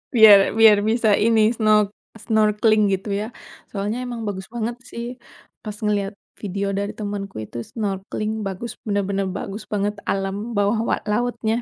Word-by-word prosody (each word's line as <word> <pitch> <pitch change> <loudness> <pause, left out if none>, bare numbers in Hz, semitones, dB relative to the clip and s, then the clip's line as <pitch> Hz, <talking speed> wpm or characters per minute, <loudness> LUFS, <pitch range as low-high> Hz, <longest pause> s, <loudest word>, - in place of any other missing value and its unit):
Biar 215 -1 +7
biar 215 -2 +7
bisa 220 0 +2
ini, 220 +2 +3
snork 215 -2 +3 0.2
snorkeling, 215 -1 +2
gitu 195 +1 -1
ya. 210 +3 -2 0.4
Soalnya 210 +4 -3
emang 240 -3 -5
bagus 190 -1 -5
banget, 235 0 -3
sih. 240 0 -8 0.4
Pas 210 -1 -7
ngelihat 200 -1 -1 0.2
video 200 0 -2
dari 200 +1 -3
temanku 200 - -5
itu 120 - -7
snorkeling, 210 - -4
bagus. 195 +3 -5 0.2
Benar-benar 200 -1 0
bagus 205 +2 -6
banget 205 0 0 0.2
alam 200 +3 -2
bawah 205 +2 +2
wa - - 0
lautnya. 230 +1 0
210 Hz, 145 wpm, -22 LUFS, 200-220 Hz, 0.4 s, Biar